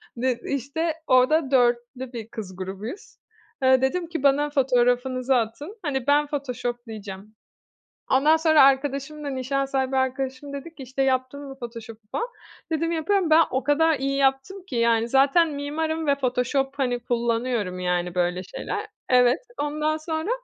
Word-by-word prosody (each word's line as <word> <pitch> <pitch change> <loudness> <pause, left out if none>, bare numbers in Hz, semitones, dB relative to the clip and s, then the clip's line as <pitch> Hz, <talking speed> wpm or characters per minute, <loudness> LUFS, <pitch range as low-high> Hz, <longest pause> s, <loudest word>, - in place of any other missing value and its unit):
Ne 250 0 0
işte. 280 +5 -2
Orada 265 +3 +4
4'lü 245 0 +1
bir 225 -2 -6
kız 195 -5 -7
grubuyuz. 195 - -7 0.5
Eee, 260 0 +5
dedim 335 +6 0
ki 325 -5 -5
bana 285 +1 +3
fotoğrafınızı 255 -1 +2
atın, 250 - -2
hani 265 -2 -2
ben 290 +1 +4
photoshop'layacağım. 235 -7 -5 0.8
Ondan 295 +4 +5
sonra 315 -2 +5
arkadaşım 275 +2 +1
da, 285 - -3
nişan 275 +1 -1
sahibi 270 -1 -1
arkadaşım 260 +1 -2
dedi 295 +4 -7
ki, 280 - -10
işte 265 +2 -2
"yaptın 260 +1 0
mı 270 - -10
photoshop'u" 230 -2 -8
falan. 470 - -2 0.4
Dedim 330 +1 0
"yapıyorum" 335 +2 +1
ben 320 +1 +7
o 260 0 -1
kadar 320 +3 +3
iyi 275 +1 -1
yaptım 275 +8 0
ki 255 - -5
yani, 230 0 +2
zaten 280 +6 +4
mimarım 315 +2 -2
ve 280 - +4
Photoshop 270 +1 0
hani 245 -3 0
kullanıyorum, 235 -5 -1
yani 180 -1 -1
böyle 180 0 0
şeyler. 185 - -5 0.2
Evet 250 +2 +4 0.2
ondan 305 +1 -1
sonra, 315 +4 -3
265 Hz, 150 wpm, -24 LUFS, 240-295 Hz, 0.8 s, ben